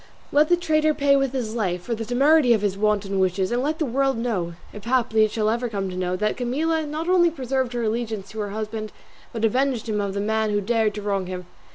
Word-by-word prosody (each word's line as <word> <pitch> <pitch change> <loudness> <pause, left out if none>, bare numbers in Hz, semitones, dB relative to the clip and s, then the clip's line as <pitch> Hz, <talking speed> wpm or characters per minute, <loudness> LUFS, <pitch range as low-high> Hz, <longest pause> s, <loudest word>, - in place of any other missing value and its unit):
Let 300 +2 +4
the 350 - +5
traitor 310 -2 +2
pay 280 0 +3
with 275 -2 +1
his 245 -5 -3
life 180 -6 -2
for 235 - -3
the 225 0 -3
temerity 265 +3 +4
of 215 -2 0
his 200 -2 0
wanton 200 -1 0
wishes, 185 0 +1
and 240 +1 +1
let 305 +4 -1
the 315 - 0
world 270 0 +1
know 195 -8 -2 0.2
(if 210 0 -10
haply 235 -3 +2
it 215 - +2
shall 215 0 -1
ever 235 +2 0
come 195 -3 -3
to - - -6
know) 180 0 -1
that 210 +3 -1
Camilla 305 +6 0
not 310 +3 -4
only 360 -2 +4
preserved 260 -4 -2
her 240 -1 -2
allegiance 220 -3 -2
to 220 - -7
her 205 -1 -2
husband, 215 +1 -5 0.4
but 225 -1 -1
avenged 250 0 0
him 210 -2 0
of 200 -1 -3
the - - -1
man 220 +1 0
who 205 0 +1
dared 220 0 +1
to 210 - -5
wrong 195 -2 -1
him. 180 -1 -6
225 Hz, 245 wpm, -23 LUFS, 205-270 Hz, 0.4 s, the